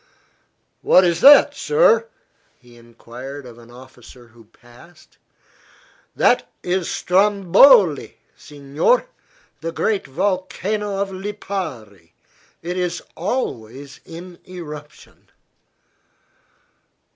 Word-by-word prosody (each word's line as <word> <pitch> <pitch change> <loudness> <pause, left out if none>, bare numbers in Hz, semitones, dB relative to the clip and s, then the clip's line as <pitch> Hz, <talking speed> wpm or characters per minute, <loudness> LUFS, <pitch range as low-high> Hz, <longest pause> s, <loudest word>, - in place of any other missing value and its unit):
"What 185 - +5
is 170 -2 0
that, 285 +1 +7
sir?" 465 0 +2 0.5
he 120 -1 -20
enquired 120 +4 -11
of 120 -1 -13
an 120 0 -17
officer 125 -1 -16
who 115 0 -20
passed. 120 +10 -21 1.0
"That - - +2
is 180 -1 -2
Stromboli, 195 - +3 0.2
signor, 145 - -1 0.5
the 165 +1 -5
great 205 +4 -2
volcano 195 +5 -3
of 200 0 -2
Lipari. 180 - -7 0.5
It 175 +2 -4
is 175 -1 -3
always 135 - -5
in 175 +2 -12
eruption." 150 -4 -12
170 Hz, 85 wpm, -20 LUFS, 125-195 Hz, 1.0 s, that